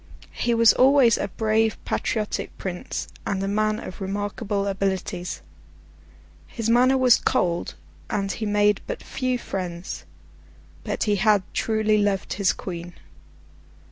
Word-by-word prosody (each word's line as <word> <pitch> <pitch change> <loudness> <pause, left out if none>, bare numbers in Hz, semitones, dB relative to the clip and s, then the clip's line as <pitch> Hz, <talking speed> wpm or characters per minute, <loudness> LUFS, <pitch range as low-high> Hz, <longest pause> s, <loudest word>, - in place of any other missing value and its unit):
He 235 -1 0
was 230 0 +6
always 260 -3 +5
a - - -1
brave, 220 +2 +1
patriotic 215 -2 -2
Prince, 180 -2 -5 0.2
and 195 -1 -2
a - - -1
man 215 +1 +1
of 185 - -9
remarkable 200 +1 -2
abilities. 190 -2 -2 1.0
His 230 -1 -2
manner 255 +3 +5
was 255 -2 +6
cold, 170 -1 0 0.3
and 195 -1 -1
he 220 - -3
made 205 0 +3
but - - -5
few 255 -1 -1
friends; 180 -5 -5 0.8
but - - -2
he 205 -1 +1
had 205 -1 +3
truly 215 -1 +1
loved 205 -2 0
his 200 -1 +2
queen. 175 -1 -7
205 Hz, 130 wpm, -24 LUFS, 195-225 Hz, 1.0 s, was